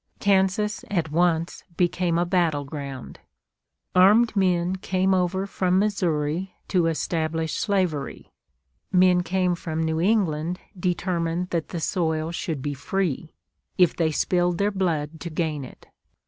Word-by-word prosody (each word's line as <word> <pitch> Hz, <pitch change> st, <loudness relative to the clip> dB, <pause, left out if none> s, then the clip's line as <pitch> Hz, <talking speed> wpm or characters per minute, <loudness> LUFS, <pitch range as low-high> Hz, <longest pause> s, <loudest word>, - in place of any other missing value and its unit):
Kansas 200 Hz, +1 st, +1 dB
at 170 Hz, -6 st, -1 dB
once 170 Hz, 0 st, +1 dB
became 175 Hz, -1 st, +1 dB
a 175 Hz, -, +2 dB
battle 170 Hz, -5 st, +1 dB
ground. 140 Hz, -3 st, -7 dB, 0.7 s
Armed 210 Hz, +5 st, +5 dB
men 180 Hz, -2 st, +2 dB
came 190 Hz, 0 st, +1 dB
over 190 Hz, +1 st, 0 dB
from 185 Hz, -2 st, 0 dB
Missouri 180 Hz, -3 st, 0 dB
to 175 Hz, -4 st, +2 dB
establish 160 Hz, 0 st, -1 dB
slavery. 185 Hz, -9 st, -1 dB, 0.6 s
Men 180 Hz, -1 st, +5 dB
came 180 Hz, 0 st, 0 dB
from 160 Hz, -2 st, -3 dB
New 160 Hz, 0 st, 0 dB
England 180 Hz, -4 st, +1 dB, 0.2 s
determined 175 Hz, -1 st, -1 dB
that 165 Hz, -2 st, -2 dB
the 170 Hz, -, -4 dB
soil 160 Hz, -1 st, -1 dB
should 165 Hz, -6 st, -4 dB
be 145 Hz, -, -2 dB
free, 160 Hz, +2 st, -2 dB, 0.4 s
if 180 Hz, -3 st, +4 dB
they 165 Hz, -2 st, +1 dB
spilled 175 Hz, +2 st, +1 dB
their 200 Hz, +2 st, +1 dB
blood 165 Hz, -5 st, -1 dB
to 170 Hz, -, -5 dB
gain 155 Hz, -3 st, -2 dB
it. 130 Hz, -, -12 dB
175 Hz, 135 wpm, -24 LUFS, 160-185 Hz, 0.7 s, Armed